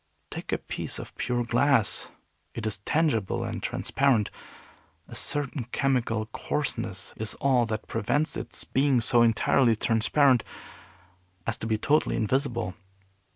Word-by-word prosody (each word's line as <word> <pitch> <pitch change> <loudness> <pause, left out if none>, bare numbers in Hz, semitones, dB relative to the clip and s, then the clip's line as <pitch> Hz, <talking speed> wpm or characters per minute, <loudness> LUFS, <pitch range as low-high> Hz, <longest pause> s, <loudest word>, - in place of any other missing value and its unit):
Take - - -6
a - - +2
piece - - -5
of - - -8
pure 120 -1 -1
glass. 120 -1 +2 0.5
It 115 - -4
is 105 -3 -2
tangible 115 - 0
and - - -4
transparent. 130 -7 +1 0.8
A - - -11
certain 140 -3 -2
chemical 120 -4 0
coarseness 115 -4 -3
is 110 0 -3
all 125 -4 +2
that 110 -1 -3
prevents 145 +9 0
its - - -2
being 135 -1 +2
so 120 +1 +4
entirely 115 +1 +4
transparent 120 +4 +3 1.0
as 115 - -1
to 110 - -5
be 110 -1 +1
totally 150 +6 +2
invisible. 120 -4 0
120 Hz, 130 wpm, -27 LUFS, 110-135 Hz, 1.0 s, so